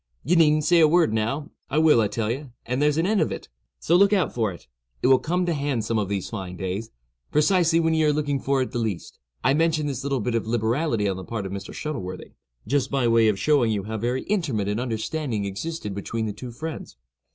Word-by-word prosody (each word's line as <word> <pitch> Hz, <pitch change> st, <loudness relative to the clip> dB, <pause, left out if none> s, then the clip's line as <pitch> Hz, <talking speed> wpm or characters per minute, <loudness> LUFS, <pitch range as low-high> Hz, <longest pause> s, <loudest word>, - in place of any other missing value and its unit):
—ye 170 Hz, +6 st, +2 dB
needn't 155 Hz, -2 st, +4 dB
say 170 Hz, +3 st, +4 dB
a 160 Hz, -, +7 dB
word 165 Hz, -7 st, +3 dB
now—I 135 Hz, +6 st, -3 dB
will, 155 Hz, -6 st, +5 dB
I 105 Hz, -, +2 dB
tell 105 Hz, +1 st, -2 dB
ye, 135 Hz, +5 st, -4 dB, 0.2 s
and 125 Hz, +3 st, -1 dB
there's 150 Hz, 0 st, +3 dB
an 165 Hz, -, +2 dB
end 205 Hz, -1 st, +2 dB
of 155 Hz, -, +1 dB
it; -, -, -7 dB, 0.3 s
so 170 Hz, -, +2 dB
look 200 Hz, +2 st, +5 dB
out 190 Hz, -5 st, +1 dB
for 110 Hz, -4 st, 0 dB
it—it -, -, -12 dB
will 130 Hz, 0 st, +6 dB
come 180 Hz, +3 st, 0 dB
to 170 Hz, -, 0 dB
hand 140 Hz, -6 st, -1 dB
some 115 Hz, -1 st, 0 dB
of 100 Hz, -2 st, -2 dB
these 100 Hz, -2 st, -2 dB
fine 95 Hz, -5 st, -6 dB
days, 95 Hz, +5 st, -4 dB, 0.4 s
precisely 165 Hz, +2 st, +3 dB
when 160 Hz, -1 st, +2 dB
ye 160 Hz, 0 st, +2 dB
are 150 Hz, -, +4 dB
looking 145 Hz, -2 st, -1 dB
for 135 Hz, 0 st, +1 dB
it -, -, -7 dB
the 120 Hz, -, -2 dB
least!" 110 Hz, -7 st, -4 dB, 0.2 s
I -, -, +4 dB
mention 160 Hz, 0 st, +2 dB
this 135 Hz, -3 st, -3 dB
little 135 Hz, -1 st, -1 dB
bit 120 Hz, +2 st, -2 dB
of 115 Hz, -1 st, -1 dB
liberality 115 Hz, 0 st, 0 dB
on 95 Hz, -1 st, -1 dB
the 95 Hz, -, -6 dB
part 110 Hz, -2 st, -4 dB
of 95 Hz, -, -5 dB
Mr. 100 Hz, 0 st, -6 dB
Shuttleworthy, 95 Hz, -13 st, -5 dB, 0.3 s
just 135 Hz, +3 st, 0 dB
by 135 Hz, -3 st, +1 dB
way 115 Hz, -1 st, +4 dB
of 105 Hz, -2 st, +2 dB
showing 140 Hz, -2 st, +3 dB
you 100 Hz, -2 st, -1 dB
how 110 Hz, +2 st, -4 dB
very 125 Hz, +4 st, -1 dB
intimate 150 Hz, -, -1 dB
an 105 Hz, +2 st, -1 dB
understanding 120 Hz, -1 st, -2 dB
existed 105 Hz, +3 st, -4 dB
between 110 Hz, +3 st, -3 dB
the 105 Hz, -, -3 dB
two 120 Hz, +4 st, -8 dB
friends. 155 Hz, -, -7 dB
125 Hz, 235 wpm, -24 LUFS, 110-155 Hz, 0.4 s, a